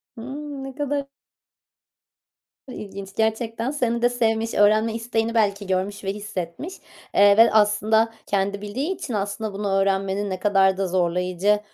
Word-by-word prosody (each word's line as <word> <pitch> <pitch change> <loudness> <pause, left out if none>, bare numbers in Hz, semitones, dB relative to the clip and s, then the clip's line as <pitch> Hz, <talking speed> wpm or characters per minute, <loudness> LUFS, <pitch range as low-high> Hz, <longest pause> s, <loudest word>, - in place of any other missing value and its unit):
Hımm, 275 +4 -7
ne 270 -1 -8
kadar 285 -1 -2 1.6
ilginç 200 -4 -8
gerçekten 225 +3 -1
seni 235 -5 -1
de 245 - +4
sevmiş, 225 -2 0
öğrenme 215 +2 +4
isteğini 230 0 -1
belki 200 -2 +1
görmüş 190 +2 -2
ve 195 0 -2
hissetmiş, 205 - -6 0.4
eee, 200 +1 +6
ve 230 - +7
aslında 220 +1 +3
kendi 200 0 -1
bildiği 265 - -3
için 305 -8 -6
aslında 205 +1 -3
bunu 205 +1 -3
öğrenmenin 195 +1 +1
ne 185 -1 -3
kadar 195 -1 +3
da 195 -1 0
zorlayıcı 180 +3 +1
210 Hz, 140 wpm, -23 LUFS, 195-230 Hz, 1.6 s, ve